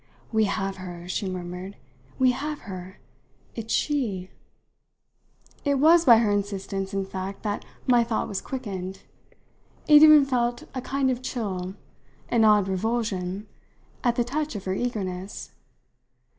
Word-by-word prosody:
"We 220 -1 +3
have 195 -1 -2
her," 175 -2 -8
she 190 +2 -2
murmured; 180 +2 -6 0.4
"we 255 -1 +4
have 295 +4 -4
her; 185 -1 -8 0.6
it's 225 -1 -6
she!" 215 -11 -1 1.3
It 285 -1 +2
was 325 +5 +5
by 235 -4 +9
her 220 -2 +2
insistence 195 -1 -2
in 195 -1 -1
fact 190 +1 -6
that 210 -1 -3 0.2
my 245 -2 +5
thought 230 -1 -1
was 195 - -3
quickened. 195 -7 -5 0.9
It 300 -1 +8
even 305 -2 +9
felt 240 -2 0
a 255 - -3
kind 270 +1 0
of 250 0 -3
chill 190 -7 -4 0.5
an 230 -2 +3
odd 210 -3 +5
revulsion 195 -1 -2 0.6
at 240 -1 +2
the 240 - +2
touch 295 +2 -3
of 200 - -6
her 190 - -1
eagerness. 195 -4 -4
210 Hz, 140 wpm, -26 LUFS, 190-250 Hz, 1.3 s, by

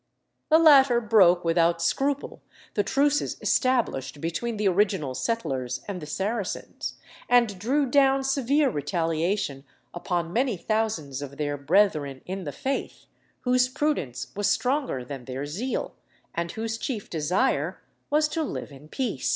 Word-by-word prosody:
The 315 - +7
latter 275 -6 +7
broke 190 -6 +4
without 170 0 +3
scruple 270 +11 -1 0.3
the 205 - +2
truces 280 +7 +1
established 235 - 0
between 210 +9 -3
the 210 -1 +1
original 190 -7 +1
settlers 130 - -2
and 195 -3 -5
the 150 - -7
Saracens, 200 +5 -3 0.3
and 235 -6 +3
drew 275 +8 +1
down 270 0 +3
severe 275 +1 +2
retaliation 165 0 -1 0.3
upon 175 -1 -2
many 245 -3 +1
thousands 190 -10 -2
of 140 -1 -8
their 145 -1 -1
brethren 145 -3 +1
in 190 0 -5
the 145 - -3
faith, 270 - -4 0.4
whose 250 0 +3
prudence 135 - -2
was 205 +1 +1
stronger 255 - 0
than 130 -1 -7
their 130 +3 -4
zeal, 205 - -3 0.4
and 170 0 -3
whose 225 0 -3
chief 220 -5 -4
desire 180 - 0 0.3
was 305 +1 +3
to 325 - -2
live 295 - -4
in 140 +2 -13
peace. 210 - -2
200 Hz, 140 wpm, -26 LUFS, 150-255 Hz, 0.4 s, The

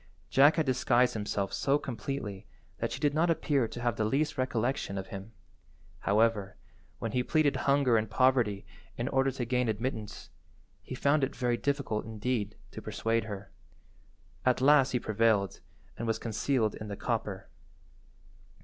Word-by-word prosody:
Jack 145 +3 +6
had 160 - +1
disguised 125 -1 +3
himself 105 -2 -2
so 140 +1 +2
completely 115 -6 -5 0.3
that - - -2
she - - -4
did 145 -1 +2
not 165 +3 +2
appear 145 -6 +1
to 120 - -8
have 120 -1 0
the 110 - +1
least 135 +8 0
recollection 130 -4 -1
of 95 - -5
him. 100 +2 -8 0.7
However, 105 -2 +1 0.4
when - - -3
he 125 - +1
pleaded 150 +2 +2
hunger 140 -4 +4
and 110 -1 -1
poverty 115 -5 +2 0.3
in 120 - -2
order 135 0 +2
to 130 -2 -3
gain 125 0 +1
admittance, 110 -1 -4 0.5
he - - -7
found 140 0 +2
it 135 - -1
very 120 -2 +1
difficult, 140 -4 -1
indeed, 110 -1 -2 0.2
to - - -8
persuade 115 0 -1
her. 100 -2 -7 0.9
At 125 -1 +3
last 135 0 +5
he 125 - 0
prevailed, 110 -3 +1 0.4
and 115 - -4
was 115 - +1
concealed 115 0 0
in 110 - -7
the 100 -1 -5
copper. - - -3
120 Hz, 160 wpm, -30 LUFS, 110-135 Hz, 0.9 s, Jack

